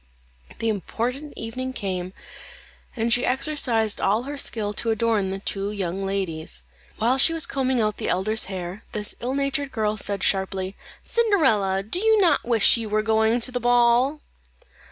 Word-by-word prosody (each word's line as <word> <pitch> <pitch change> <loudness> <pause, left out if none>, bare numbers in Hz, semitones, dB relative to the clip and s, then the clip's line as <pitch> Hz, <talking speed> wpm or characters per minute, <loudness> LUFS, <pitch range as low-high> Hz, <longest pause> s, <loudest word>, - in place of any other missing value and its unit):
The 230 - -2
important 240 - -3
evening 255 +3 -4
came, 185 -4 -4 0.8
and 230 -1 +1
she 245 - +2
exercised 250 -5 +1
all 210 +5 +2
her 285 +2 -6
skill 220 -6 -1
to 230 - -2
adorn 220 -3 +1
the 190 - -3
two 195 +1 -3
young 195 -2 -3
ladies. 165 - -3 0.3
While 245 +4 +2
she 330 - +6
was 325 - +4
combing 260 -2 0
out 215 -2 0
the - - -3
elder's 215 +5 +1
hair, 185 +1 -6
this 210 -1 -2
ill 250 +3 -3
natured 280 0 -1
girl 215 -2 -1
said 200 -2 0
sharply, 190 0 -1 0.3
"Cinderella, 230 - +2
do 220 - 0
you 440 +1 +4
not 360 -4 +3
wish 230 -1 +4
you 225 -2 -5
were 215 +1 +1
going 220 +2 +2
to 255 - +1
the 250 - -2
ball?" 245 +4 +3
225 Hz, 165 wpm, -24 LUFS, 200-255 Hz, 0.8 s, she